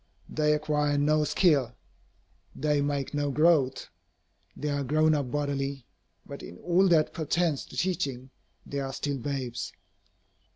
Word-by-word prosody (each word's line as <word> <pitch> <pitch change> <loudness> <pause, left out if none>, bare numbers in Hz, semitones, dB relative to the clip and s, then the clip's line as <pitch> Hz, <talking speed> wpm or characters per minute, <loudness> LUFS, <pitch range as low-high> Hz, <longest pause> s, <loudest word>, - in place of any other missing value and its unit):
They 150 -1 +1
acquire 150 -1 +1
no 150 +1 +3
skill. 140 -9 +2 0.8
They 150 0 +1
make 140 -1 -2
no 145 -1 0
growth. 145 -3 +3 0.7
They 150 - -2
are 140 -1 -1
"grown 155 +3 +3
up" 140 -4 -1
bodily. 140 -2 -2 0.4
But - - -8
in 85 - -10
all 180 - +3
that 160 -4 +3
pertains 160 -1 0
to - - -11
teaching, 135 -8 -2 0.3
they 140 - -4
are 135 -1 -3
still 140 -1 -2
babes. 125 -2 -4
145 Hz, 135 wpm, -28 LUFS, 135-155 Hz, 0.8 s, no